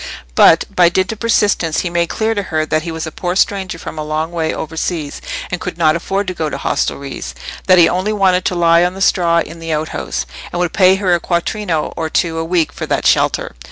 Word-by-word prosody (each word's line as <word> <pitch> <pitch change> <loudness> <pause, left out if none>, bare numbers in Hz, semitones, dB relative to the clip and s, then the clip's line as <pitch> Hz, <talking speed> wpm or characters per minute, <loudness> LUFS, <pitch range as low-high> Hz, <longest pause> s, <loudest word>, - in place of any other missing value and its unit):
But, - - +6
by 175 -1 +6
dint 185 +3 0
of 220 - -7
persistence, 205 -8 +1
he 175 - -3
made 170 0 0
clear 220 0 0
to 205 - -1
her 160 -5 -1
that 155 0 0
he 165 +1 -5
was 160 0 -4
a 160 - -6
poor 180 +3 -3
stranger 190 -2 0
from 160 - -7
a - - -2
long 155 +2 -2
way 160 -2 -1
over 160 +1 -5
seas, 160 -3 -3 0.3
and 180 - -3
could 180 - -5
not 155 -2 +3
afford 195 +4 -2
to 185 - -3
go 160 -3 -2
to 140 - -4
hostelries; 135 - -3 0.3
that 185 - +6
he 170 -2 +7
only 185 +4 0
wanted 190 -3 +2
to 180 - 0
lie 170 0 +4
on 180 +1 0
the - - -8
straw 170 -3 +3
in 165 +1 -8
the 165 0 -5
outhouse, 155 - -3 0.3
and 175 - -3
would 175 -2 0
pay 190 -1 +5
her 190 -2 +1
a 175 - +2
quattrino 170 -1 -2
or 160 - -3
two 165 0 0
a - - -1
week 165 -1 0
for - - -5
that - - -1
shelter. - - +2
170 Hz, 240 wpm, -16 LUFS, 160-185 Hz, 0.3 s, he